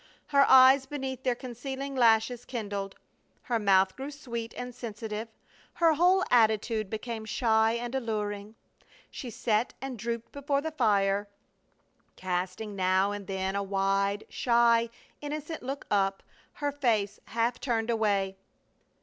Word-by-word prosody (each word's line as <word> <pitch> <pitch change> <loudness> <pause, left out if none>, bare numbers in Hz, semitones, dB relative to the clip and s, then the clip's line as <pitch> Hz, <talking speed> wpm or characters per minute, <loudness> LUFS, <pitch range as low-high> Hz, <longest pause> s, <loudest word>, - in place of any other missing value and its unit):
Her 280 -1 +5
eyes 265 +1 +7
beneath 265 -2 -4
their 255 -2 0
concealing 265 +3 -6
lashes 230 0 +3
kindled. 205 -5 -5 0.5
Her 235 -2 0
mouth 190 -2 +3
grew 270 +2 -6
sweet 235 -6 -6
and 250 0 -5
sensitive, 220 -2 -5 0.5
her 330 -2 +4
whole 360 +4 +4
attitude 220 -2 +2
became 220 +1 -5
shy 220 0 +2
and 240 +1 -4
alluring. 210 -4 -3 0.6
She 255 - -7
sat 225 0 0
and 265 -4 -6
drooped 235 +1 -4
before 280 0 -1
the 320 +2 -3
fire, 205 -7 +2 0.9
casting 185 +3 -3
now 190 +1 +2
and 205 -1 -6
then 190 0 -2
a 200 - 0
wide, 195 +1 0
shy, 235 -1 +3 0.3
innocent 300 +2 -5
look 270 +2 -5
up, 195 -1 +1 0.3
her 290 -1 -2
face 225 -8 0
half 230 +2 -1
turned 235 -3 -1
away. 200 -4 0
230 Hz, 130 wpm, -29 LUFS, 205-260 Hz, 0.9 s, eyes